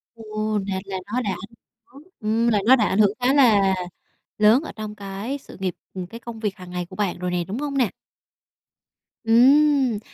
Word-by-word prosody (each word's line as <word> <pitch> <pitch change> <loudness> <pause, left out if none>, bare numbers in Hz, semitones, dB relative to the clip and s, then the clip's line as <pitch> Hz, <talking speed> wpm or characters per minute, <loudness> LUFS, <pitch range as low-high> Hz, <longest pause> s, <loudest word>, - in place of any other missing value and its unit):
Ồ. 215 -1 -3
Là 190 -1 -2
là 195 -1 -4 0.2
nó 250 - +1
đã 230 - -4
ảnh - - 0 0.6
hưởng, 275 +3 -15 0.2
ừm, 225 +2 0
là 215 -3 +3
nó 255 +3 +7
đã 225 -5 +2
ảnh 195 - 0
hưởng 205 -2 +5
khá 250 +2 +2
là 210 -9 +5 0.6
lớn 215 +7 +5
ở - - -7
trong 215 -1 -6
cái 200 +6 -5
sự 280 - -14
nghiệp, 185 -2 -2 0.2
ừm, 185 -2 -5
cái 230 +5 -10
công 235 -1 -9
việc 210 -3 -2
hàng 180 -1 -11
ngày 180 0 -3
của 185 - -13
bạn 200 -4 -2
rồi 180 0 -2
nè, 175 -1 0
đúng 205 - -4
hông 285 -1 -3
nè? 245 -6 +2 1.3
Ừm, 260 +1 +4
215 Hz, 205 wpm, -23 LUFS, 195-245 Hz, 1.3 s, nó